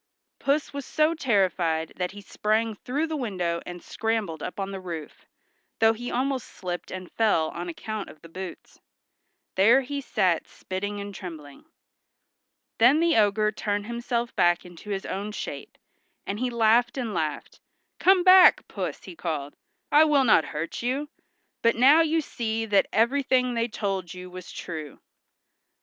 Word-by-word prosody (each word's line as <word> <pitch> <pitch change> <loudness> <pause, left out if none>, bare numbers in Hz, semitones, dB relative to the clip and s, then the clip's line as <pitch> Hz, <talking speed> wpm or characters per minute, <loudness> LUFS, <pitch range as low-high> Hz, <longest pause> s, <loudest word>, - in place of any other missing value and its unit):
Puss 285 +1 0
was 280 0 -4
so 310 +4 +2
terrified 185 - +1
that 180 -1 -1
he 205 +2 -10
sprang 215 +2 0
through 265 +9 -2
the 320 -1 -4
window 180 - -2
and 175 0 -8
scrambled 220 -8 -2
up - - -5
the 195 -1 -4
roof, 170 -5 -8 0.5
though 225 0 +5
he 245 +2 -6
almost 260 0 -1
slipped 180 -1 -6
and 185 -1 -7
fell 205 -8 +2
on 175 +1 -6
account 215 +4 -5
of 155 - -14
the - - -10
boots. 185 +2 -9 0.7
There 230 +8 +5
he 280 +2 -4
sat 180 -9 +1
spitting 205 +2 -5
and 200 0 -6
trembling. 160 - -9 1.1
Then 250 +7 +6
the 335 0 +3
ogre 215 0 +3
turned 205 -1 -2
himself 235 +1 -3
back 175 +1 +3
into 175 +3 -12
his 195 -1 -3
own 205 +2 -4
shape, - - -7 0.5
and 200 +1 -4
he 255 0 0
laughed 235 +2 +3
and 235 -5 -3
laughed. 155 -4 -3 0.4
"Come 375 -1 +5
back, 370 0 +7
Puss," - - -5
he - - -10
called, 150 - -4 0.4
"I 300 +2 +7
will 290 -3 +4
not 215 -9 +5
hurt 155 +2 -5
you; 265 +5 -2 0.5
but 230 - +3
now 275 +7 +6
you 325 0 +2
see 225 -5 -3
that 205 -3 +3
everything 255 +2 +2
they 230 0 0
told 195 -5 -3
you 180 0 -9
was 180 0 -9
true." 155 -4 -7
215 Hz, 160 wpm, -26 LUFS, 180-250 Hz, 1.1 s, back